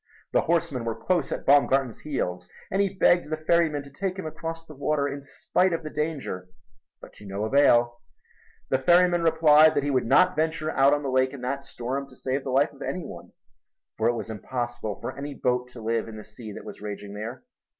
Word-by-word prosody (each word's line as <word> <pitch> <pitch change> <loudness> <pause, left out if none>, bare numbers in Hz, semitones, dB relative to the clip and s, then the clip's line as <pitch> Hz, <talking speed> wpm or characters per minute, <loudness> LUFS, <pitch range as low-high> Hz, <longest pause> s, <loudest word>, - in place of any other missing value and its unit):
The - - +3
horsemen 155 -7 0
were 115 -1 -2
close 180 -2 0
at - - -4
Baumgarten's 135 -3 +3
heels, 90 -12 -3 0.2
and 195 - +2
he 195 -1 0
begged 175 -4 +4
the 155 - -1
ferryman 155 -2 +1
to 140 - -14
take 185 +6 -3
him 190 - -5
across 165 +1 -6
the 155 - -12
water 140 +1 0
in 140 0 -5
spite 180 +6 0
of 165 - -2
the 155 - -6
danger, 145 - -3 0.5
but - - -13
to 105 - -14
no 100 +2 -3
avail. 120 -2 +4 0.7
The 130 - +2
ferryman 175 +4 +4
replied 160 -1 +6
that 145 - +1
he 145 - 0
would 130 -3 +1
not 135 - +5
venture 155 0 -1
out 140 0 +4
on 145 - -4
the 135 - -2
lake 130 +1 +2
in 140 - -8
that 135 +2 -3
storm 135 +2 -4
to - - -16
save 135 +1 -2
the - - -5
life 140 +4 +2
of 140 - -17
any 180 +2 -3
one, - - -10 0.7
for 110 - +3
it 120 - +2
was 115 -1 -5
impossible 120 -1 -4
for - - -5
any 140 0 -6
boat 125 -1 0
to 115 - -10
live 115 0 0
in 110 -1 -8
the 105 - -8
sea 110 +1 -9
that - - -9
was - - -9
raging 105 -1 -6
there. 110 - -6
140 Hz, 220 wpm, -26 LUFS, 120-155 Hz, 0.7 s, replied